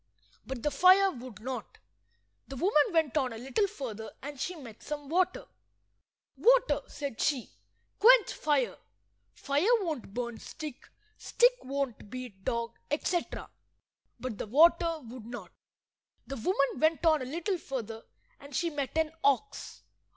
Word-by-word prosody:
But 260 -3 -5
the 295 - +1
fire 370 +6 +6
would 240 - -10
not. 255 +2 -6 0.7
The 275 - -7
woman 300 +1 +4
went 320 -5 +2
on 260 -4 +1
a - - -7
little 270 - 0
further 225 - -6
and 285 -1 -7
she 360 +6 -3
met 240 -9 -11
some 290 -1 -6
water. 365 +2 +1 0.9
"Water," - - +4
said 280 -6 -5
she, 275 -6 0 0.5
"quench 475 +1 +7
fire. 290 -5 0 0.5
Fire 285 +9 0
won't 310 - -4
burn 235 +1 -4
stick, 300 -5 -8 0.3
stick - - +4
won't 270 -5 -4
beat 245 -6 -8
dog," 235 +1 -2
etc. 335 +4 -2 0.7
But 255 -5 -5
the - - -4
water 330 - +4
would 230 -1 -9
not. 220 -8 -8 0.7
The 275 - -6
woman 275 - +1
went 320 +3 +2
on 315 -3 +5
a - - -3
little 340 +7 -2
further, 225 -7 -5 0.4
and 280 -1 -10
she 340 -1 0
met 290 0 -3
an 320 -1 +2
ox. 280 - 0
280 Hz, 145 wpm, -30 LUFS, 245-330 Hz, 0.9 s, quench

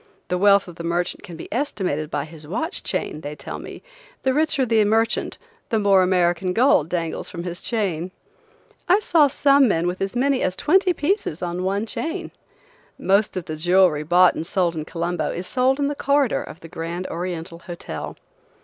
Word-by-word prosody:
The 180 - 0
wealth 200 0 +5
of 175 - -11
the 170 - -6
merchant 175 +1 -1
can 180 -4 -10
be 160 - -8
estimated 185 - -2
by 145 -3 -2
his 155 -1 -13
watch 320 - -3
chain, 155 - -3
they 145 0 -6
tell 140 - -7
me; - - -10 0.4
the 265 - +2
richer 300 -2 +2
the 225 -2 +3
merchant 225 +2 +1 0.3
the 225 - +1
more 200 -2 +4
American 180 0 +2
gold 225 - +4
dangles 170 -2 -3
from 170 -1 -6
his 175 -1 -5
chain. 185 -7 -1 0.8
I 370 - +7
saw 330 -8 +4
some 275 0 +4
men 170 -5 +1
with 180 +1 -2
as 195 +4 -2
many 270 +1 +2
as 185 - 0
twenty 370 - +3
pieces 315 - -1
on 175 0 -3
one 195 +3 -1
chain. 320 +8 -4 0.7
Most 200 +1 +2
of 180 - -4
the 155 - -5
jewelry 175 -1 +3
bought 175 +4 +5
and 165 - -5
sold 175 -3 0
in 155 -1 -4
Colombo 170 +1 -2
is 175 - -4
sold 255 +5 +2
in 285 - 0
the 290 - 0
corridor 280 -2 +1
of 165 - -10
the 165 - -10
Grand 165 +2 -5
Oriental 170 -1 -5
Hotel. 170 - -7
185 Hz, 190 wpm, -22 LUFS, 170-245 Hz, 0.8 s, I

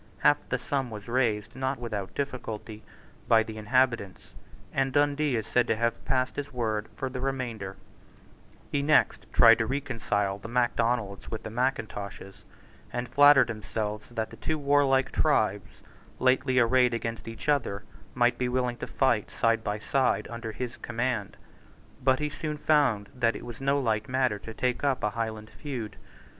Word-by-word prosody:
Half - - +5
the - - +1
sum 135 -3 -2
was 105 -2 -8
raised, 115 -4 0
not 130 +1 -1
without 110 -5 -5
difficulty, 115 -5 -5 0.5
by 110 -1 +5
the 110 -1 -8
inhabitants; 115 -3 0 0.4
and 135 0 +1
Dundee 145 0 +2
is 110 -2 -1
said 120 -1 +2
to - - +2
have 115 +1 -1
passed 130 -1 0
his 145 -1 -4
word 110 -4 -2
for 135 - -3
the 130 -1 -5
remainder, 120 -8 -3 0.9
He 140 - +1
next 150 +2 +3
tried 115 -2 +7
to 110 - 0
reconcile 115 -7 -1
the 110 - -8
Macdonalds 115 -3 0
with 110 - -5
the 110 - -6
Mackintoshes, 110 -5 -3 0.5
and 120 0 -3
flattered 145 -3 +7
himself 105 -1 -4
that 115 -2 -3
the 115 - -11
two 155 +7 -2
warlike 140 -2 +3
tribes, 105 -9 0 0.3
lately 130 0 +2
arrayed 125 0 +4
against 115 0 -4
each 115 +4 -8
other, 125 -9 +1 0.3
might 120 -1 +2
be 125 -1 0
willing 125 -1 0
to - - -5
fight 120 -6 +1
side 115 -1 +1
by 105 0 -1
side 125 -1 +1
under 115 -1 -5
his 120 +2 -5
command. 120 -3 -2 0.7
But 130 0 +4
he 150 +1 -2
soon 150 +1 -4
found 140 -10 +2
that 120 -3 +1
it - - -7
was 120 +1 -8
no 140 +1 +2
light 110 -4 -1
matter 130 -5 +1
to 115 - -9
take 125 +1 -1
up 135 -3 +1
a 105 - +1
Highland 110 -1 -4
feud. 125 -8 -6
120 Hz, 165 wpm, -28 LUFS, 110-130 Hz, 0.9 s, tried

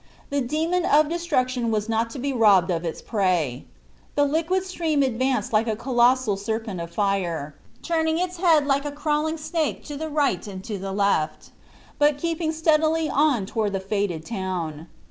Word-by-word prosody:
The 285 0 +1
demon 320 +7 0
of 300 -2 +4
destruction 255 -8 0
was 215 -1 -1
not 225 0 0
to 230 - -8
be 275 +2 -2
robbed 200 -6 +4
of 170 -1 -1
its 165 -2 -5
prey. 175 - 0 0.5
The 290 - +4
liquid 330 +6 0
stream 325 -6 0
advanced 255 -1 0
like 220 +2 +3
a 220 - 0
colossal 240 -2 +2
serpent 215 -2 -3
of 170 - -6
fire, 175 -7 -1 0.3
turning 320 -1 +1
its 360 +1 -2
head 330 -5 +4
like 280 0 +1
a 290 - -3
crawling 300 +2 -1
snake 315 0 -2
to 295 - -6
the 315 +2 -4
right 280 - 0
and 190 -2 -8 0.3
left, 160 -7 0 0.5
but 295 -1 +4
keeping 325 +1 -1
steadily 315 0 +2
on 280 -8 +2
toward 210 0 -2
the 195 - 0
fated 190 -5 -2
town. 175 -7 -4
255 Hz, 165 wpm, -24 LUFS, 200-310 Hz, 0.5 s, of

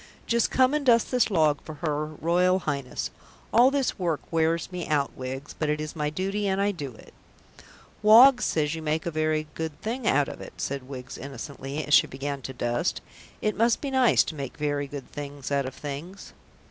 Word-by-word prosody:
Just 235 0 +2
come 260 +1 +3
and 300 -1 0
dust 235 -3 +4
this 250 -3 +3
log 155 -7 +2
for 155 - -9
her 150 -1 -2
Royal 175 +4 +2
Highness. 140 -7 -3 0.4
All 240 +3 +7
this 275 -5 -1
work 170 -5 0
wears 165 +2 +1
me 180 -2 -4
out, 145 -2 0
Wiggs, 130 +3 -6
but 155 - -2
it 150 0 0
is 155 +1 -5
my 150 -2 -1
duty 195 +6 -2
and 190 0 0
I 200 +1 +2
do 140 - -7
it." - - -16 0.9
"Woggs 245 +5 +8
says 150 -1 0
you 160 - -5
make 155 +1 -1
a 170 - -1
very 155 0 0
good 160 -2 -5
thing 235 +2 -3
out 140 +1 +3
of - - -8
it," - - -9
said 135 -1 -4
Wiggs 130 -1 -8
innocently, 140 +2 -6
as 145 - -1
she - - +7
began 140 +1 -5
to 135 - -6
dust. 120 -1 -1 0.4
"It 215 - +1
must 230 +1 +3
be 280 - -4
nice 260 -3 +5
to - - -5
make 140 -4 -6
very 145 -1 -1
good 140 -1 -8
things 145 -1 -7
out 140 -2 +1
of 130 - -7
things." 155 +7 -7
155 Hz, 205 wpm, -26 LUFS, 140-195 Hz, 0.9 s, Woggs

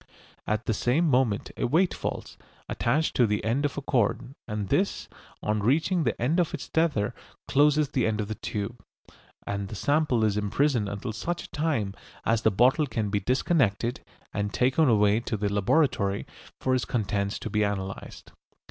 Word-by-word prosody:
At 110 +2 -1
the 110 - +1
same 135 +10 +1
moment 125 -7 +1
a - - 0
weight 170 +8 +2
falls, - - -5 0.3
attached 150 +7 0
to 120 - +5
the 105 0 -1
end 125 +6 +1
of 145 - -2
a 140 - -3
cord, 125 0 0
and 105 -3 -3
this, 195 +1 0 0.4
on 105 0 0
reaching 155 - +2
the 115 - -1
end 150 +9 +1
of 175 - +1
its - - -7
tether, 145 -9 +1 0.3
closes 150 +1 +3
the 125 -5 +1
end 110 -1 -1
of 105 - -2
the 110 - -3
tube, 105 +2 -5 0.6
and 100 0 -3
the 110 - -7
sample 145 0 +1
is 105 -1 +2
imprisoned 105 +1 +1
until 100 +3 -4
such 170 - -4
time 145 -11 -1 0.3
as 115 0 +2
the 110 - +4
bottle 130 - +3
can 110 -6 -2
be 100 - +1
disconnected 120 - +1 0.3
and 100 0 -2
taken 130 +4 +3
away 105 -1 +4
to 115 -2 -3
the 100 0 -1
laboratory 100 -2 +1 0.3
for 130 - 0
its 130 - +1
contents 100 -3 -1
to 110 - -6
be 105 - +1
analysed. 95 -2 -4
115 Hz, 175 wpm, -27 LUFS, 105-145 Hz, 0.6 s, to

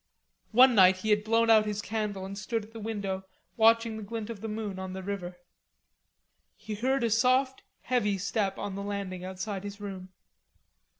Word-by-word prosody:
One 250 +3 +7
night 190 -3 +6
he 215 +3 -1
had 210 0 +3
blown 225 +1 +3
out 215 -1 +5
his 210 -1 -2
candle 210 -3 -3
and 195 +1 -6
stood 215 +2 -3
at 220 - -19
the 225 - -8
window 200 -3 -3 0.3
watching 230 0 +4
the - - -6
glint 225 +1 -5
of 210 -4 -8
the 225 - -4
moon 210 -3 -4
on 190 0 -5
the 190 0 -6
river. 180 -2 -5 1.2
He 215 - -7
heard 260 +5 0
a 230 - +2
soft 255 +3 +2 0.2
heavy 210 -6 0
step 195 +1 -1
on 200 - -4
the 200 - -5
landing 200 -3 -4
outside 190 +1 -5
his 205 0 -7
room. 190 -2 -7
210 Hz, 185 wpm, -29 LUFS, 195-225 Hz, 1.2 s, One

